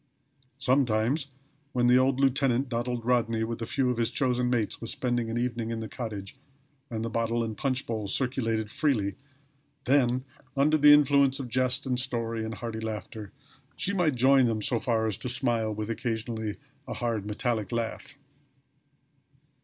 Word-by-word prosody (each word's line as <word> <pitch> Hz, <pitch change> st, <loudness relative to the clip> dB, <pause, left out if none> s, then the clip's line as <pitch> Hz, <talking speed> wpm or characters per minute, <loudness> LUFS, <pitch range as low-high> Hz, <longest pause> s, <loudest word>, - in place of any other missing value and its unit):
Sometimes, 130 Hz, +1 st, +1 dB, 0.5 s
when 125 Hz, -1 st, +2 dB
the 125 Hz, +1 st, +6 dB
old 130 Hz, 0 st, +2 dB
lieutenant, 135 Hz, -1 st, +2 dB
Donald 120 Hz, -1 st, -2 dB
Rodney, 115 Hz, -2 st, +2 dB
with 115 Hz, +1 st, -4 dB
a 115 Hz, -, -3 dB
few 130 Hz, -1 st, +1 dB
of 125 Hz, -, -3 dB
his 115 Hz, -1 st, +1 dB
chosen 125 Hz, -2 st, 0 dB
mates 115 Hz, -5 st, -1 dB
was 115 Hz, -, -4 dB
spending 120 Hz, -2 st, -1 dB
an 115 Hz, -, -2 dB
evening 120 Hz, -2 st, -1 dB
in 115 Hz, -1 st, -3 dB
the 110 Hz, -, -4 dB
cottage, 110 Hz, -1 st, -6 dB, 0.5 s
and 115 Hz, -1 st, -3 dB
the -, -, -2 dB
bottle 115 Hz, +1 st, 0 dB
and 110 Hz, -1 st, -4 dB
punch 130 Hz, +3 st, -1 dB
bowl 110 Hz, -3 st, -3 dB
circulated 115 Hz, -2 st, -1 dB
freely, 110 Hz, -10 st, +1 dB, 0.7 s
then, 130 Hz, -1 st, +2 dB, 0.3 s
under 150 Hz, +3 st, +4 dB
the 145 Hz, 0 st, +8 dB
influence 140 Hz, -2 st, +5 dB
of 130 Hz, -3 st, -5 dB
jest 130 Hz, +3 st, +1 dB
and 125 Hz, -2 st, 0 dB
story, 115 Hz, -3 st, -2 dB
and 110 Hz, 0 st, -4 dB
hearty 115 Hz, 0 st, -5 dB
laughter, 110 Hz, -1 st, -6 dB, 0.4 s
she 200 Hz, -, -2 dB
might 170 Hz, -8 st, +2 dB
join 130 Hz, +1 st, +5 dB
them 110 Hz, -2 st, -1 dB
so 120 Hz, +1 st, +1 dB
far 115 Hz, -2 st, 0 dB
as 110 Hz, -3 st, -1 dB
to 125 Hz, -, -4 dB
smile, 120 Hz, -3 st, 0 dB
with 105 Hz, +1 st, -3 dB
occasionally 110 Hz, -1 st, -3 dB, 0.3 s
a -, -, -4 dB
hard 115 Hz, -4 st, -1 dB
metallic 110 Hz, -1 st, -1 dB
laugh. 115 Hz, +3 st, -3 dB
120 Hz, 170 wpm, -28 LUFS, 110-130 Hz, 0.7 s, the